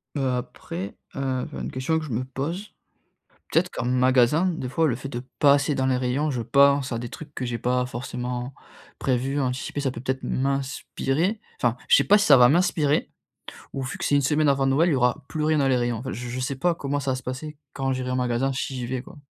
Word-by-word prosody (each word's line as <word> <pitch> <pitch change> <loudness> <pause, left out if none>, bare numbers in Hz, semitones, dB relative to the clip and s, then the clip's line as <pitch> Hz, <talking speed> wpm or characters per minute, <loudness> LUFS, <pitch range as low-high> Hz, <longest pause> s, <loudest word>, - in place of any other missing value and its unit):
Heu, 135 -2 0
après, 125 +9 -5 0.2
heu, 130 -2 -1
enfin, - - -7
une - - -4
question 130 +5 0
que 155 - -3
je 135 - -7
me 120 +3 -1
pose, 155 +10 -5 0.8
peut-être - - +2
qu'en - - -4
magasin, 130 +5 +3
des 165 -8 -2
fois, 160 +5 +2
le 125 - 0
fait 135 +3 -7
de 120 -2 -5 0.2
passer 145 0 +4
dans 130 0 +1
les 130 - +2
rayons 130 +4 0
je 120 -3 -2
pense 140 +1 +4
à 115 - -1
des 120 - -5
trucs 145 +4 -10
que 130 - -3
j'ai 120 -1 -2
pas 125 +1 0
forcément 125 +1 -4 0.5
prévus, 135 +2 0
anticipés. 130 +2 -2
Ça 135 - 0
peut, - - -7
peut-être 130 +1 -3
m'inspirer 140 - -1 0.2
enfin, 120 -1 +2
je - - +7
sais - - +3
pas 205 +1 +6
si 205 - +2
ça 145 - +8
va 125 -1 +7
m'inspirer 155 -2 +2 0.6
ou 135 - -3
vu 130 - -5
que - - -3
c'est 145 - +3
1 - - +4
semaine 150 +2 +2
avant 135 -1 +3
Noël, 145 +6 +3
il 165 - +2
y - - +2
aura 125 +3 +1
plus 155 -1 -2
rien 155 0 +3
dans 135 -2 +3
les 130 - +3
rayons 120 -2 0
enfin, 130 +2 -5
je 120 +1 -5
je 125 +2 -4
sais 130 +1 -2
pas 175 +5 +1
comment 145 -2 -2
ça 140 -2 -1
va - - 0
se 130 - -6
passer 140 +4 -6 0.2
quand 135 -1 -1
j'irai 130 0 -3
en 130 - 0
magasin, 125 +2 0
si 135 0 -3
j'y 125 -2 -3
vais 130 +1 -2
quoi. 180 - -13
135 Hz, 245 wpm, -25 LUFS, 125-145 Hz, 0.8 s, ça